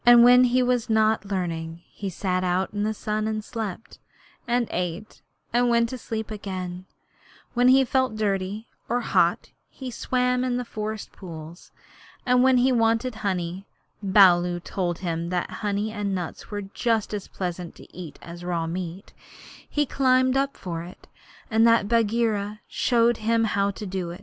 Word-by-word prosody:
When 240 +1 +8
he 250 +1 +3
was 245 -1 0
not 220 -2 +3
learning 170 -4 -3
he 200 - -4
sat 185 0 -1
out 185 +2 0
in 205 - -2
the 215 +1 0
sun 215 +1 -2
and 215 -1 -2
slept, 220 -1 -6 0.5
and 240 -1 +1
ate 180 +4 -4 0.3
and 245 0 +3
went 235 -1 +3
to 255 - -5
sleep 220 -1 -5
again; 185 -3 -5 0.7
when 245 0 +3
he 265 +1 +6
felt 260 -3 +1
dirty 205 0 -1 0.2
or 245 +1 +1
hot - - +1 0.2
he 260 -2 -7
swam 250 +1 0
in 250 -1 0
the 250 - -3
forest 215 -1 -5
pools; 165 -2 -10 0.5
and 250 -1 +4
when 260 0 +5
he 255 +2 +4
wanted 230 +1 +2
honey 185 -1 -2 0.3
(Baloo 180 -3 +5
told 175 0 -2
him 170 0 -2
that 180 -1 -2
honey 205 +1 -1
and 205 -2 -2
nuts 180 -3 -6
were 205 -1 -4
just 220 +2 -1
as 205 -2 -4
pleasant 180 -2 -5
to - - -16
eat 175 -4 -8
as 170 +1 -9
raw 170 -2 -1
meat) 175 +2 -5 0.6
he 295 0 +1
climbed 260 -1 +3
up 275 +1 0
for 170 -3 -5
it, 175 +2 -12 0.4
and 225 +1 +5
that 230 -3 +4
Bagheera 215 -2 +1
showed 235 -1 +2
him 225 +1 +1
how 200 -2 +1
to 205 +1 -6
do. 180 -2 -4
210 Hz, 165 wpm, -25 LUFS, 180-235 Hz, 0.7 s, When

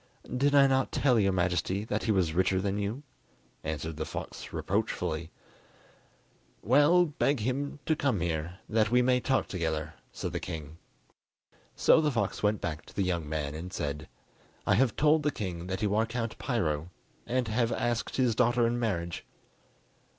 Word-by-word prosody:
"Did 140 +3 +2
I 140 -1 +8
not 135 -1 +2
tell 125 -5 +3
your 100 -2 +3
Majesty 95 +2 0
that 110 -1 -2
he 110 - +2
was 90 -6 +1
richer 95 +2 +2
than 100 +1 -1
you?" 105 +8 -3 0.6
answered 80 0 -4
the 80 - -2
fox - - -7
reproachfully. 80 +1 -2 1.3
"Well, 145 - +5
beg 145 -4 0
him 135 +5 -2
to 160 - +2
come 135 -9 0
here, 85 +1 -2
that 110 -1 +2
we 125 +2 +4
may 125 0 +3
talk 130 +2 +1
together," 80 -4 -2 0.2
said - - -5
the - - -1
king. 80 0 -7 1.0
So 160 - +5
the 150 - +2
fox 125 -5 -1
went 105 0 +1
back 75 -3 -3
to - - -15
the 100 - +1
young 85 -5 -1
man 75 -2 -2
and 85 +4 -6
said: 75 -2 -4 0.6
"I - - +3
have 120 +3 +3
told 155 +1 +4
the 150 - +1
king 90 - -5
that 95 +2 -3
you 105 -1 +1
are 110 +2 +2
Count 115 -1 -4
Piro, 85 - -1 0.4
and 125 -1 0
have 115 +1 +1
asked 120 0 -1
his 125 -3 +3
daughter 120 +1 +3
in 120 +1 0
marriage." 85 -7 -2
105 Hz, 170 wpm, -29 LUFS, 85-125 Hz, 1.3 s, I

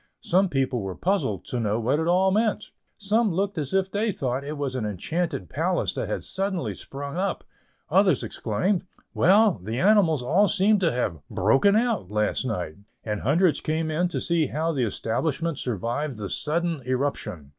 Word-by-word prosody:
Some 185 +2 +3
people 135 -4 0
were 95 -2 -5
puzzled 175 - -1
to 125 - -3
know 110 0 0
what 130 +6 +1
it 160 - -1
all 185 +2 +3
meant; 215 +1 0 0.3
some 210 +1 +1
looked 195 +1 -1
as 140 -3 -4
if 190 0 +1
they 215 +2 0
thought 130 -5 -2
it 150 +2 -5
was 140 -2 -2
an 130 -3 -2
enchanted 105 - -2
palace - - -1
that - - -3
had - - -3
suddenly 190 -2 -2
sprung 140 +3 -7
up; 195 +2 -1 0.4
others - - +3
exclaimed, 190 0 -1 0.3
"Well, 200 - +4
the 110 +4 -3
animals 180 -8 +4
all 185 +11 +3
seem 205 +1 +3
to 170 -4 +2
have 105 -10 -2
'broken 135 - +3
out' 225 - +1
last 105 +4 0
night," 90 -10 -3 0.3
and 105 -2 -3
hundreds 160 +6 +2
came 160 0 -1
in 170 +4 +1
to 175 - -3
see 170 -3 +1
how 160 +3 -1
the 135 -6 0
establishment 150 +9 -2
survived 120 +4 -2
the 100 -2 -5
sudden 165 +1 -1
eruption. 125 - -2
155 Hz, 175 wpm, -25 LUFS, 125-190 Hz, 0.4 s, Well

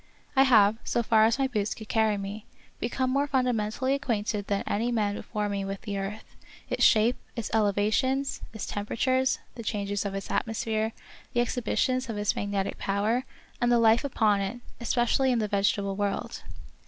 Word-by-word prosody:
I 270 0 +6
have, 220 -3 +5
so 235 - 0
far 220 -1 +5
as 230 +2 +2
my 270 - +2
boots 215 -6 -1
could 220 - -10
carry 220 -2 +2
me, 200 +2 -6 0.3
become 255 +2 -1
more 280 +2 +1
fundamen 250 -6 +1
tally 260 +4 0
acquainted 215 -7 -1
than 200 -1 0
any 230 +4 0
man 210 -3 +1
before 210 0 -3
me 200 -1 -2
with 195 0 -5
the 205 -3 -4
earth, 200 +3 -5 0.5
its - - +1
shape, 225 +3 +5 0.2
its 230 -4 -4
elevations, 220 +6 +1
its 220 - -5
tempera 205 +2 -4
tures, 260 +2 +2 0.2
the 235 - -8
changes 205 -2 -2
of 200 -1 -3
its 195 - -5
atmosphere, 220 0 -1 0.4
the 240 - +1
exhibi 240 -1 -1
tions 255 -1 +1
of 220 - -3
its 205 0 0
magnetic 200 -1 -2
power, 215 +6 0 0.4
and 240 0 +3
the 240 - +5
life 230 +1 +4
upon 215 -7 +2
it, 200 +5 -3 0.2
especially 240 +2 +2
in 245 - +2
the 215 -2 0
vegetable 200 -1 +1
world. 200 0 -2
220 Hz, 185 wpm, -27 LUFS, 205-245 Hz, 0.5 s, I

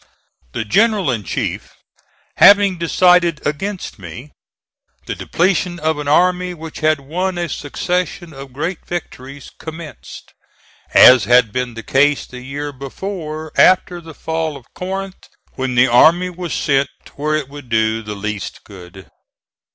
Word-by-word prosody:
The 115 - -3
General 205 - +2
in 115 -4 -3
chief - - -4 0.6
having 200 -3 +6
decided 175 -1 +3
against 180 - -4
me, 115 - -10 0.7
the - - -3
depletion 180 0 0
of 155 -1 -1
an 145 - -5
army, 180 +3 +2
which 160 -1 -9
had 155 -1 +2
won 180 +6 -3
a 175 -1 -1
succession 175 +3 -3
of 135 -1 -10
great 160 +7 -4
victories, 140 -5 -7
commenced, 160 -2 -10 0.6
as 125 -1 +8
had 120 -2 +4
been 125 -2 -3
the 115 - -7
case 145 +2 +2
the 125 -1 -10
year 145 +3 -5
before 155 +3 -6
after 180 -1 +4
the 160 -2 -12
fall 160 -2 -3
of 130 - -16
Corinth 195 +1 -5 0.3
when 130 -1 -3
the 125 +1 +6
army 170 +9 +4
was 175 -2 -6
sent 140 -1 +1 0.2
where 155 +2 -1
it 155 -3 -2
would 140 -2 -12
do 110 0 +1
the 105 -1 -7
least 105 -1 -5
good. 95 -1 -13
150 Hz, 145 wpm, -18 LUFS, 130-175 Hz, 0.7 s, as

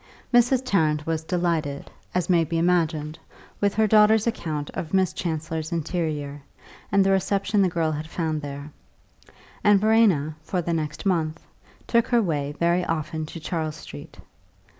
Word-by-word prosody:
XIII 240 -1 +7
Mrs. 245 +1 0
Tarrant 155 -8 +1
was 160 -1 -2
delighted, 165 -5 -2 0.2
as 180 -2 +1
may 175 -3 +4
be 165 +1 -2
imagined, 165 -2 0 0.4
with 200 -1 +1
her 220 +1 +3
daughter's 215 0 +5
account 155 -10 -3
of 165 +2 -4
Miss 190 -2 +2
Chancellor's 160 -2 -3
interior, 155 -4 -3 0.5
and 200 -1 +4
the 195 - +3
reception 200 +2 +1
the 190 - +3
girl 165 -2 0
had 155 +1 -4
found 160 -2 -2
there; 145 +1 -7 0.9
and 205 -1 +5
Verena, 200 -9 +3
for 180 +4 -2
the 170 0 -1
next 155 -1 -3
month, 165 -4 0 0.4
took 235 -1 +2
her 240 - +3
way 150 -8 -1
very 170 +1 +2
often 155 -1 -3
to 165 - -8
Charles 160 -1 -3
Street. 75 - -11
165 Hz, 160 wpm, -24 LUFS, 155-195 Hz, 0.9 s, XIII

